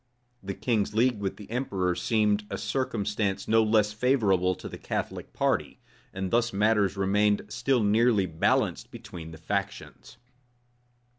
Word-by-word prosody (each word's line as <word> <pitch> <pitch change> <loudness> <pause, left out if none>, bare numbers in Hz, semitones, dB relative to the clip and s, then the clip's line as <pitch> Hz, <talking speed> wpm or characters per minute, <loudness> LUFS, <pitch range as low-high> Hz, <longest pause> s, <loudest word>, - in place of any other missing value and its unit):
The 100 0 -5
king's 110 -4 -1
league 120 -1 +2
with 100 -2 -3
the 105 - -11
emperor 95 -8 -1
seemed 105 +1 +1
a - - -3
circumstance 105 -6 -2
no 115 +1 +4
less 105 -1 +2
favorable 105 -7 +2
to - - -9
the - - -9
Catholic - - -4
party; - - -1 0.3
and 95 -1 -4
thus 120 0 +2
matters 105 -1 +2
remained 105 +2 +2
still 125 +2 +1
nearly 105 -1 +3
balanced 80 -2 0
between 80 -2 -9
the 80 - -10
factions. 100 +4 -5
105 Hz, 140 wpm, -27 LUFS, 95-115 Hz, 0.3 s, no